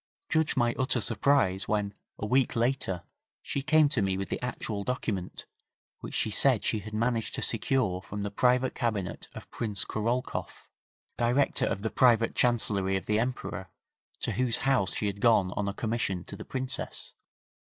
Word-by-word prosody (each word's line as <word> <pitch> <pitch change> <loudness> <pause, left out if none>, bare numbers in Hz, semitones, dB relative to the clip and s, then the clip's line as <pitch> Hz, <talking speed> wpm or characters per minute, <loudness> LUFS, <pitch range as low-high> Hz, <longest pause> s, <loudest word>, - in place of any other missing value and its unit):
Judge 160 -2 +1
my 120 -2 +3
utter 130 -1 +1
surprise 110 -3 +2
when, 105 -1 0 0.2
a - - -4
week 130 +4 +2
later, 115 -7 0 0.4
she 140 - -2
came 155 +2 +4
to 140 -6 0
me 95 -1 0
with 100 - -4
the - - -3
actual 110 -4 -3
document 105 -6 -3 0.5
which - - -7
she 110 - 0
said 125 +1 +3
she 110 - 0
had 110 +2 -9
managed 115 0 0
to - - -4
secure 115 -5 +1
from 100 +1 -6
the 100 - -3
private 125 +4 +2
cabinet 110 -6 -2
of - - -10
Prince 105 -4 0
Korolkoff, 120 +4 -3 0.5
director 125 +4 +2
of 100 - -2
the 110 - -1
private 115 -1 +4
Chancellerie 100 -6 +1
of 95 - -6
the 105 +1 +1
Emperor, 115 -6 -3 0.5
to - - -1
whose 125 -2 +1
house 130 -9 +2
she - - -1
had 100 0 -3
gone 105 -6 +4
on 100 +1 -2
a - - 0
commission 110 -6 -2
to - - -9
the - - -9
Princess. 130 -1 -1
115 Hz, 170 wpm, -29 LUFS, 100-125 Hz, 0.5 s, came